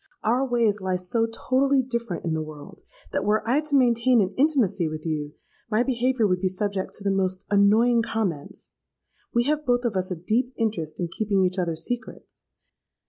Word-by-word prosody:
Our 250 Hz, +5 st, +1 dB
ways 230 Hz, -4 st, +1 dB
lie 185 Hz, -1 st, -1 dB
so 185 Hz, +6 st, 0 dB
totally 265 Hz, +3 st, +1 dB
different 235 Hz, -8 st, -4 dB
in 165 Hz, -, 0 dB
the 160 Hz, -, -1 dB
world, 155 Hz, -2 st, -10 dB, 0.3 s
that -, -, -1 dB
were 210 Hz, +2 st, +1 dB
I 265 Hz, +6 st, +3 dB
to 300 Hz, -2 st, -2 dB
maintain 245 Hz, -1 st, +4 dB
an 195 Hz, -1 st, +1 dB
intimacy 255 Hz, -, +2 dB
with 155 Hz, 0 st, -7 dB
you, 150 Hz, -2 st, -3 dB, 0.4 s
my 220 Hz, +2 st, +2 dB
behaviour 255 Hz, -2 st, +1 dB
would 180 Hz, -2 st, +1 dB
be 190 Hz, -, +2 dB
subject 190 Hz, +1 st, -3 dB
to 200 Hz, -, -10 dB
the 200 Hz, -, +1 dB
most 190 Hz, 0 st, -1 dB
annoying 220 Hz, +4 st, +4 dB
comments. 195 Hz, -10 st, -4 dB, 0.6 s
We 235 Hz, -1 st, +2 dB
have 300 Hz, +3 st, 0 dB
both 245 Hz, -2 st, +1 dB
of 225 Hz, -4 st, -1 dB
us 185 Hz, 0 st, -1 dB
a 180 Hz, -, -2 dB
deep 230 Hz, +9 st, -1 dB
interest 205 Hz, -9 st, -2 dB
in 175 Hz, -, -1 dB
keeping 200 Hz, 0 st, +1 dB
each 185 Hz, +1 st, -1 dB
other's 165 Hz, -2 st, -2 dB
secrets. 245 Hz, 0 st, -6 dB
215 Hz, 190 wpm, -25 LUFS, 185-245 Hz, 0.6 s, maintain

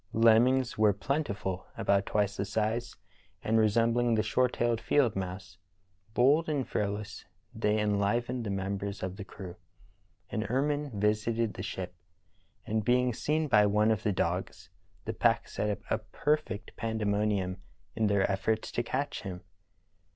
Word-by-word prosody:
Lemmings 115 Hz, +2 st, +4 dB
were 105 Hz, -1 st, +5 dB
plentiful, 100 Hz, -, -2 dB
about 100 Hz, 0 st, +2 dB
twice 105 Hz, -1 st, +1 dB
the -, -, -1 dB
size 110 Hz, +4 st, -1 dB
of -, -, -26 dB, 0.4 s
and 110 Hz, +1 st, +2 dB
resembling 115 Hz, +2 st, +3 dB
the 110 Hz, -, +2 dB
short 125 Hz, +3 st, +1 dB
tailed 120 Hz, -1 st, 0 dB
field 120 Hz, -1 st, +2 dB
mouse. 95 Hz, 0 st, -5 dB, 0.6 s
Bold 145 Hz, +7 st, +4 dB
and 140 Hz, -4 st, -1 dB
fearless, 105 Hz, 0 st, -3 dB, 0.3 s
they 105 Hz, +1 st, +1 dB
enlivened 105 Hz, +4 st, 0 dB
the 105 Hz, -, -4 dB
members 100 Hz, +1 st, -3 dB
of 95 Hz, 0 st, -3 dB
the 100 Hz, -, -7 dB
crew. 95 Hz, -2 st, -9 dB, 0.7 s
An 110 Hz, -, -1 dB
ermine 145 Hz, +5 st, 0 dB
visited 110 Hz, +2 st, +1 dB
the -, -, -6 dB
ship, 95 Hz, -2 st, -5 dB, 0.7 s
and, 110 Hz, 0 st, -1 dB
being 125 Hz, +2 st, +2 dB
seen 155 Hz, +6 st, 0 dB
by 105 Hz, -6 st, +5 dB
one 105 Hz, +2 st, +3 dB
of 110 Hz, -1 st, 0 dB
the 110 Hz, -, +1 dB
dogs, 90 Hz, +1 st, -2 dB, 0.3 s
the 110 Hz, -, -2 dB
pack 115 Hz, +1 st, +2 dB
set 105 Hz, -, -2 dB
up 105 Hz, -, -2 dB
a -, -, +2 dB
perfect 145 Hz, -9 st, -2 dB
pandemonium 105 Hz, -4 st, 0 dB, 0.4 s
in 110 Hz, -1 st, +2 dB
their 100 Hz, -1 st, +3 dB
efforts 110 Hz, +3 st, -1 dB
to -, -, 0 dB
catch 140 Hz, +4 st, -3 dB
him. 90 Hz, -4 st, -6 dB
110 Hz, 150 wpm, -30 LUFS, 100-120 Hz, 0.7 s, were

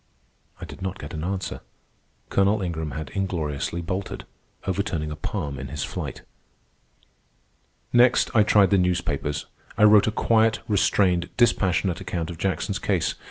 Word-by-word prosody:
I -, -, -6 dB
did -, -, -11 dB
not 95 Hz, +1 st, -3 dB
get -, -, -8 dB
an 80 Hz, -1 st, -4 dB
answer. 95 Hz, +1 st, -3 dB, 0.7 s
Colonel 100 Hz, +1 st, +2 dB
Ingram 80 Hz, -3 st, -3 dB
had 80 Hz, -5 st, -6 dB
ingloriously 85 Hz, -4 st, -2 dB
bolted, 95 Hz, +3 st, -4 dB, 0.4 s
overturning 90 Hz, -5 st, -2 dB
a -, -, -4 dB
palm 75 Hz, -5 st, -4 dB
in -, -, -5 dB
his 75 Hz, -, -4 dB
flight. -, -, -5 dB, 1.7 s
Next 120 Hz, +1 st, +4 dB
I 110 Hz, -, +7 dB
tried 105 Hz, -2 st, +4 dB
the 100 Hz, -, +5 dB
newspapers. 80 Hz, -5 st, -1 dB, 0.3 s
I -, -, +3 dB
wrote 105 Hz, -1 st, +7 dB
a -, -, +2 dB
quiet, 110 Hz, 0 st, +2 dB
restrained, 95 Hz, -4 st, +2 dB
dispassionate 95 Hz, -5 st, +2 dB
account 90 Hz, -2 st, -3 dB
of 85 Hz, -, -10 dB
Jackson's 95 Hz, +2 st, -1 dB
case. 95 Hz, -5 st, 0 dB
95 Hz, 145 wpm, -24 LUFS, 80-100 Hz, 1.7 s, I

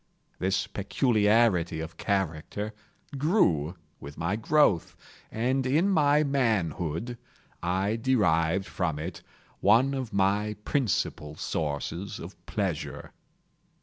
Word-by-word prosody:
This 95 Hz, 0 st, +1 dB
peculiarity 105 Hz, -5 st, +2 dB
of 80 Hz, +1 st, -6 dB
character 95 Hz, +2 st, -2 dB, 0.5 s
grew 90 Hz, -, +2 dB, 0.2 s
with 70 Hz, 0 st, -10 dB
my 85 Hz, +5 st, -1 dB
growth, 110 Hz, -, +2 dB, 0.4 s
and 130 Hz, +4 st, 0 dB
in 150 Hz, +9 st, +2 dB
my 150 Hz, -4 st, +4 dB
manhood, 110 Hz, -, -1 dB, 0.4 s
I 95 Hz, +5 st, 0 dB
derived 95 Hz, -7 st, +2 dB
from 85 Hz, -6 st, -2 dB
it 80 Hz, +3 st, -6 dB, 0.4 s
one 120 Hz, +7 st, +4 dB
of 130 Hz, -4 st, -3 dB
my 100 Hz, +2 st, +1 dB
principal 95 Hz, -, -1 dB
sources 80 Hz, +6 st, -3 dB
of -, -, -10 dB
pleasure. -, -, -3 dB
100 Hz, 100 wpm, -28 LUFS, 85-125 Hz, 0.5 s, my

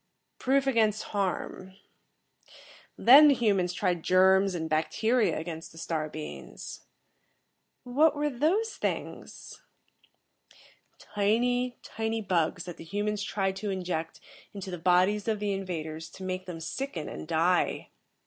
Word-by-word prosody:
"Proof 270 Hz, +1 st, +2 dB
against 220 Hz, -5 st, +2 dB
harm. 190 Hz, -1 st, -3 dB, 1.2 s
Then 280 Hz, +5 st, +9 dB
the 285 Hz, -, +5 dB
humans 200 Hz, -7 st, +1 dB
tried 180 Hz, -2 st, -1 dB
germs 190 Hz, +2 st, +4 dB
and 160 Hz, -2 st, -3 dB
bacteria 195 Hz, +6 st, +1 dB
against 165 Hz, 0 st, -6 dB
the 165 Hz, -, -16 dB
star 160 Hz, -2 st, -3 dB
beings." 155 Hz, 0 st, -8 dB, 1.0 s
"What 290 Hz, +6 st, +3 dB
were 295 Hz, 0 st, -1 dB
those 355 Hz, -, +1 dB
things?" -, -, -5 dB, 1.4 s
"Tiny, 245 Hz, +4 st, 0 dB
tiny 225 Hz, 0 st, -3 dB
bugs 180 Hz, -4 st, 0 dB
that 175 Hz, -2 st, -8 dB
the -, -, -9 dB
humans 205 Hz, +4 st, -2 dB
tried 195 Hz, -1 st, -1 dB
to 210 Hz, +1 st, -4 dB
inject 175 Hz, -4 st, -3 dB, 0.4 s
into 195 Hz, -1 st, -6 dB
the 180 Hz, -, -5 dB
bodies 185 Hz, +5 st, +3 dB
of 220 Hz, -2 st, 0 dB
the 205 Hz, -1 st, -1 dB
invaders 160 Hz, -4 st, -5 dB
to 190 Hz, -, -10 dB
make 185 Hz, 0 st, -4 dB
them 165 Hz, -2 st, -6 dB
sicken 165 Hz, -, -4 dB
and -, -, -7 dB
die. 170 Hz, +2 st, +1 dB
190 Hz, 130 wpm, -28 LUFS, 175-225 Hz, 1.4 s, Then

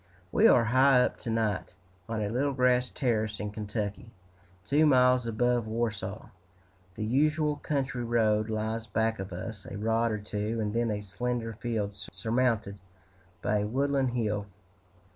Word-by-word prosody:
We -, -, +5 dB
are 120 Hz, -, +6 dB
high 130 Hz, +2 st, +5 dB
up -, -, -1 dB
to -, -, -6 dB
night, 110 Hz, -5 st, -1 dB, 0.3 s
on 110 Hz, -2 st, -1 dB
a 100 Hz, -, -1 dB
little 135 Hz, +5 st, 0 dB
grass 125 Hz, -1 st, +2 dB
terrace 110 Hz, -5 st, -1 dB
in 105 Hz, 0 st, -3 dB
Kentucky, 105 Hz, 0 st, -4 dB, 0.6 s
two 155 Hz, +2 st, +4 dB
miles 125 Hz, -3 st, +4 dB
above 120 Hz, 0 st, +1 dB
Warsaw. 110 Hz, -2 st, -3 dB, 0.7 s
The 105 Hz, -, -3 dB
usual 150 Hz, +5 st, +2 dB
country 135 Hz, -4 st, -2 dB
road 110 Hz, -2 st, +2 dB
lies 110 Hz, +1 st, -2 dB
back 110 Hz, +1 st, 0 dB
of 95 Hz, 0 st, -5 dB
us, 100 Hz, +3 st, -7 dB
a -, -, -6 dB
rod 115 Hz, +2 st, +1 dB
or 105 Hz, -, -1 dB
two, 105 Hz, +2 st, -3 dB
and 105 Hz, -1 st, -1 dB
then 115 Hz, 0 st, +1 dB
a 105 Hz, -1 st, -2 dB
slender 115 Hz, +3 st, -3 dB
field 110 Hz, -2 st, -3 dB
surmounted 110 Hz, -1 st, -1 dB, 0.6 s
by 105 Hz, -, +1 dB
a 105 Hz, -, -1 dB
woodland 135 Hz, +1 st, +1 dB
hill. 105 Hz, -4 st, -1 dB
115 Hz, 155 wpm, -29 LUFS, 105-125 Hz, 0.7 s, are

